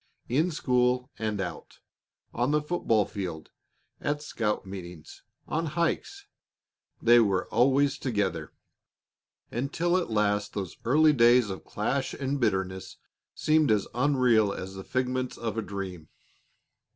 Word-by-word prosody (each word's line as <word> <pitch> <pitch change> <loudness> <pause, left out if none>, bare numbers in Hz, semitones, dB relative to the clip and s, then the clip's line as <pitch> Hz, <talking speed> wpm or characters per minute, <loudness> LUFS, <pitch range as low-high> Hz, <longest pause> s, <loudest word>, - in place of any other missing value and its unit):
In 150 +9 +2
school 125 -3 +1
and 110 -2 -2
out, 90 -2 -6 0.6
on 120 +3 0
the 150 +1 +2
football 115 - +1
field, 90 -6 -6 0.5
at 145 +1 -2
scout 105 -8 -2
meetings, 90 -4 -9 0.3
on 165 +1 -1
hikes, 170 - -2 0.7
they 120 +1 +6
were 100 -5 +2
always 135 +4 +3
together, 110 -6 -2 1.0
until 140 +8 0
at 180 - -2
last 105 -1 0
those 95 -4 -4
early 155 +5 +5
days 120 -4 +5
of 95 - -7
clash 130 +6 -2
and 140 +1 -2
bitterness 95 -5 -1 0.4
seemed 155 -1 +3
as 105 -2 +2
unreal 125 -5 +3
as 95 -1 -6
the 95 0 -8
figments 130 +1 -2
of 115 -2 -3
a 115 - -1
dream. 95 -6 -6
120 Hz, 125 wpm, -28 LUFS, 100-140 Hz, 1.0 s, they